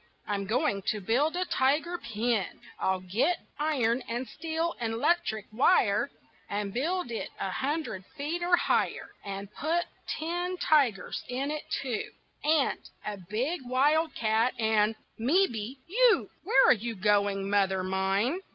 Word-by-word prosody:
I'm 200 -1 -2
going 225 -2 +1
to 215 - +1
build 255 - +1
a 365 +1 0
tiger 315 +5 +1
pen. 220 -3 0 0.3
I'll 190 -1 0
get 240 - +1 0.2
iron 260 -6 +1
and 240 +2 -2
steel 330 +1 -2
and 225 -1 -1
'lectric 230 - +1
wire 265 +11 +3 0.4
And 200 -1 -2
build 325 +2 -1
it 230 - -3
a 190 - -2
hundred 260 - -2
feet, 305 +5 -2
or 350 0 +4
higher, - - 0
And 200 +1 -6
put 335 +4 0 0.2
ten 350 +3 -2
tigers 265 - +2
in 270 +3 -2
it 305 0 -4
too, 255 -5 -2 0.3
And 300 -2 +2 0.3
a 210 -1 -3
big 260 +12 -1
wildcat, 255 -4 +2
and 220 -1 +2 0.2
mebbe 255 - +1
you. 465 +5 +3
Where 270 - +5
are - - +9
you 230 0 -4
going, 200 -1 +2
mother 195 -2 +2
mine? 195 - +1
245 Hz, 140 wpm, -29 LUFS, 210-315 Hz, 0.4 s, are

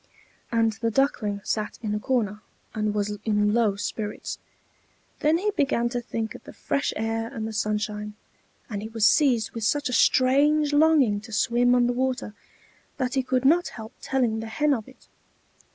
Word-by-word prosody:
And 225 -1 +2
the 230 - +1
Duckling 215 -5 0
sat 215 -1 -2
in 210 -1 -1
a 210 - -1
corner 215 -4 -1 0.3
and 215 -1 -1
was 205 0 -2
in 210 -1 +2
low 220 -4 +2
spirits; 205 +1 -5 0.8
then 310 +2 +3
he 420 +4 0
began 270 - +1
to 245 0 -3
think 225 -2 -4
of - - -12
the - - -12
fresh 280 - -1
air 225 +1 -2
and 220 -1 -4
the 220 - -6
sunshine; 210 0 -2 0.5
and 205 -3 -5
he 215 - -5
was 225 -1 0
seized 250 -4 +3
with 230 - -6
such 290 +5 +1
a - - -3
strange 290 +5 +3
longing 290 -9 +4
to 225 +1 -12
swim 240 +3 +2
on 245 -1 +4
the 245 - +1
water, 255 -3 -2 0.6
that 255 -2 -1
he 270 - +2
could 255 0 -1
not 340 +5 +4
help 220 +1 -9
telling 245 -5 0
the 225 - -5
Hen 295 +6 +1
of 225 -5 -3
it. 265 - -18
230 Hz, 185 wpm, -25 LUFS, 215-265 Hz, 0.8 s, longing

